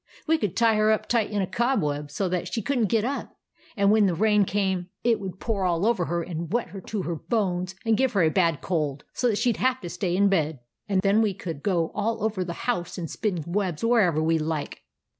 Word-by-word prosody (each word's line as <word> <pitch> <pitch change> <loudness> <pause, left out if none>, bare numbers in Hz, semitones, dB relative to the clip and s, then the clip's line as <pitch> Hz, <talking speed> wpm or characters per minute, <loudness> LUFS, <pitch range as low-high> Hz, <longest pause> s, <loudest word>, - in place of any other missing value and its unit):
We 320 0 +2
could 200 -4 -2
tie 230 -2 +4
her 215 0 +4
up 215 - 0
tight 230 -3 +1
in 205 -2 0
a - - +1
cobweb 165 - 0
so 185 +6 -2
that 180 -1 -2
she 225 - -2
could 275 +4 0
n't 215 -4 +2
get 225 -1 +2
up; 275 +3 -4 0.4
and 200 0 +4
then - - +6
when 215 -1 +5
the 175 - 0
rain 210 +2 +3
came 190 -2 -1
it 235 -2 +3
would 190 -2 -7
pour 210 -4 -1
all 175 +1 +1
over 225 -7 +2
her 170 0 -1
and 165 -1 -5
wet 240 +2 0
her 195 - -8
to 205 0 -4
the 170 - -2
bones, 185 -4 0
and 225 -1 +3
give 260 -1 +1
her 195 -4 +3
a 160 - +4
bad 165 -5 +2
cold, 150 -6 -2
so 250 - 0
that 215 -4 +1
she 240 +1 +2
'd - - -10
have 260 0 +1
to 175 -3 -6
stay 180 -1 -1
in 200 +1 +4
bed; 160 -7 +1 0.3
and 190 -1 +1
then 200 +2 +4
we 210 -4 +1
could 165 -6 -6
go 170 -4 0
all 220 +1 -1
over 210 -4 0
the 170 -1 -6
house 180 -9 -1
and 170 -3 -5
spin 185 -7 -2
webs 180 -1 -2
wherever 200 -10 +3
we 160 0 +2
like." 155 -1 -3
195 Hz, 255 wpm, -25 LUFS, 170-220 Hz, 0.4 s, then